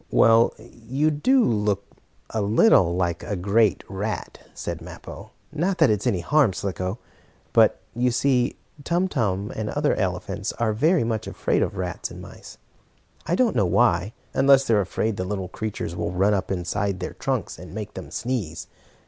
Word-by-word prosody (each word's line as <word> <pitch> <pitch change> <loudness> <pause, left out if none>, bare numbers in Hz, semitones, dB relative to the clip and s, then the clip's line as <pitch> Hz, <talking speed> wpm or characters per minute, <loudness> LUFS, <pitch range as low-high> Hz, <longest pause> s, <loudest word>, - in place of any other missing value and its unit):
"Well, 115 +1 +5
you 120 +6 -2
do 250 - +3
look 105 -3 +1 0.5
a 110 - -1
little 100 - +4
like 85 -2 -1
a 105 - -3
great 100 +3 +2
rat," 105 +2 -4 0.2
said - - -5
Mappo. - - -10 0.2
"Not 180 +5 0
that 160 -8 +5
it's 105 +3 0
any 95 -7 +1
harm, 140 - +3
Slicko. 95 +1 -3 0.6
But, - - +5
you 125 +2 +1
see, 125 +1 +1 0.3
Tum 175 +4 +1
Tum 105 - -1
and 110 -1 -3
other - - +1
elephants - - -2
are 115 -2 0
very 155 - +3
much 110 -1 -2
afraid - - 0
of 100 - -1
rats 90 -1 -3
and - - -10
mice. - - -12 0.7
I 175 - +2
don't 240 +2 +2
know 100 - +3
why, 95 0 +2 0.2
unless 135 0 +5
they 115 - +2
are 105 - +4
afraid 100 +3 -2
the - - -1
little 95 -1 -4
creatures 100 -5 -4
will 85 - -2
run 95 +3 +3
up 95 -2 -1
inside 95 +1 -2
their 90 - -5
trunks - - -3
and - - -10
make - - -6
them - - -8
sneeze. 110 -11 -3
110 Hz, 175 wpm, -24 LUFS, 95-125 Hz, 0.7 s, Well